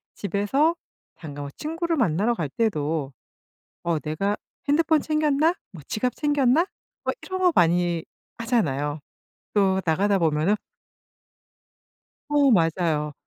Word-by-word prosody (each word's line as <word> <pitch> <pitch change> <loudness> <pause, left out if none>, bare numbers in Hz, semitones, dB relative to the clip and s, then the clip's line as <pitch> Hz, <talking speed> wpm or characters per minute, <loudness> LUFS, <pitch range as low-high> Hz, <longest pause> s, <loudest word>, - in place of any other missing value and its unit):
집에서 205 - +1 0.4
잠깐 145 -3 -8
뭐 140 - -6
친구를 330 +2 -2
만나러 215 - +2
갈 155 -8 -3
때도 155 -8 -1 0.7
'어 170 -3 0
내가 195 +8 -1 0.3
핸드폰 315 +1 +3
챙겼나?' 305 +1 +2 0.2
뭐 165 -6 -11
'지갑 250 +3 -1
챙겼나?' 290 +1 +3 0.4
뭐 - - 0
이런 375 0 -4
거 360 - +5
많이 175 -1 +2 0.3
하잖아요. 155 - 0 0.5
또 190 -2 +3
나가다 195 +5 +2
보면은 160 +4 +2 1.7
어 290 -2 +4
맞아요. 165 -5 +1
200 Hz, 230 characters per minute, -24 LUFS, -, 1.7 s, 거